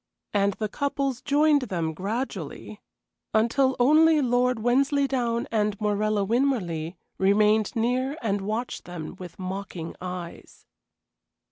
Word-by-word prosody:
And 200 0 +2
the 215 +2 -3
couples 275 +1 -2
joined 290 0 +3
them 165 -3 -1
gradually, 220 - -5 0.5
until 260 +4 +3
only 310 +5 +5
Lord 250 -1 +2
Wensleydown 250 0 +1
and 210 -2 0
Morella 210 -1 +1
Winmarleigh 190 - 0 0.2
remained 210 +3 +3
near 255 +5 0
and 205 -3 -1
watched 215 +5 -3
them 175 -3 -7
with 175 -2 -9
mocking 185 -3 -5
eyes. 180 -2 -8
220 Hz, 110 wpm, -26 LUFS, 195-260 Hz, 0.5 s, only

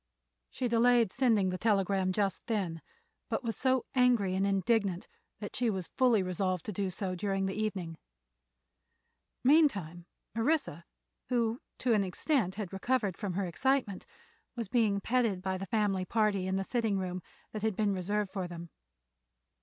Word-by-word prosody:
She 250 - -2
delayed 235 -2 +4
sending 225 -8 +3
the 185 - -4
telegram 195 -3 +2
just 195 -1 -1
then, 185 -8 -2 0.5
but - - -1
was 230 -2 -2
so 260 -1 +1
angry 245 -7 +3
and 195 +1 +1
indignant 195 -2 +1 0.3
that 205 -2 -6
she 245 -2 +1
was 190 -4 -3
fully 240 -6 +4
resolved 185 -1 -1
to - - -3
do 195 +1 -1
so 185 +1 -3
during 195 +1 -1
the 190 - -2
evening. 190 -6 -3 1.4
Meantime 200 - +3 0.3
Orissa, 230 - 0 0.4
who 235 -1 0 0.2
to 250 -2 +1
an 210 -2 +3
extent 190 - 0
had 200 -3 -5
recovered 205 -1 0
from 200 -4 -4
her 195 +2 -1
excitement, 225 - 0 0.5
was 230 -5 -4
being 210 -4 +2
petted 230 -4 +1
by 190 0 -2
the 195 - -5
family 195 -2 +1
party 210 -3 +1
in 190 - 0
the 195 - 0
sitting 225 -2 0
room 185 -1 -3 0.3
that 215 - -5
had 220 -2 0
been 205 -1 +1
reserved 200 +2 -1
for 190 -2 -3
them. 170 -1 -9
200 Hz, 160 wpm, -31 LUFS, 185-230 Hz, 1.4 s, delayed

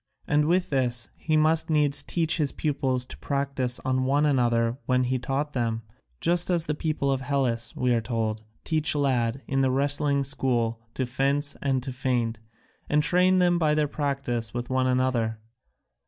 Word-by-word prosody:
And 150 0 +2
with 180 0 +1
this 125 -3 0
he 155 -1 0
must 155 +1 +2
needs 145 -2 +3
teach 165 +2 0
his 150 -4 +1
pupils 135 -4 -1
to - - -11
practise 140 -3 -1
on 130 0 +1
one 140 +3 +2
another 120 -3 +1
what 125 0 +2
he 130 +1 -1
taught 140 +4 -2
them, 115 -2 -1 0.4
just 175 +1 +2
as 175 -2 +2
the 155 - -2
people 150 -2 -1
of 135 -1 -1
Hellas, 125 -4 -1
we 125 -1 +1
are 115 - +1
told, 110 -2 -2 0.2
teach 160 0 +2
lads 130 -4 +1
in 135 0 0
the 135 - +2
wrestling 140 +1 +2
school 120 -4 0 0.2
to 130 - -1
fence 140 +3 0
and 135 -2 0
to 135 - -4
feint, 125 -3 -1 0.5
and 150 0 +3
train 180 +3 +3
them 175 -1 +3
by 155 -2 +2
their 150 -1 +1
practice 140 -6 -3
with 120 +1 -4
one 130 0 +1
another. 125 -3 0
135 Hz, 175 wpm, -26 LUFS, 125-150 Hz, 0.5 s, needs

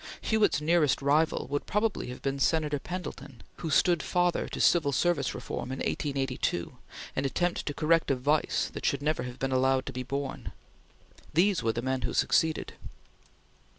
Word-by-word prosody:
Hewitt's 220 -7 +2
nearest 155 -2 +2
rival 150 +3 +2
would 145 - -2
probably 210 +1 0
have 125 - -8
been 140 0 -1
Senator 150 0 +1
Pendleton 175 -7 -7
who 165 - -4
stood 170 +2 +3
father 175 -1 +1
to - - -6
civil 160 -5 +4
service 140 -1 +1
reform 130 - -5
in 130 - -4
1882, 135 - -2 0.4
an 135 - 0
attempt 175 +6 -1
to 145 - -1
correct 165 +1 +2
a 135 - +3
vice 145 +4 0
that - - -7
should 140 0 0
never 150 -3 0
have 125 0 -6
been 135 0 -2
allowed 130 0 +2
to 135 - -6
be 130 - -4
born. 135 +2 -4 0.8
These 190 +2 +3
were 115 -1 0
the 120 - -3
men 130 0 -1
who - - -3
succeeded. 160 -1 +1
145 Hz, 170 wpm, -29 LUFS, 130-165 Hz, 0.8 s, civil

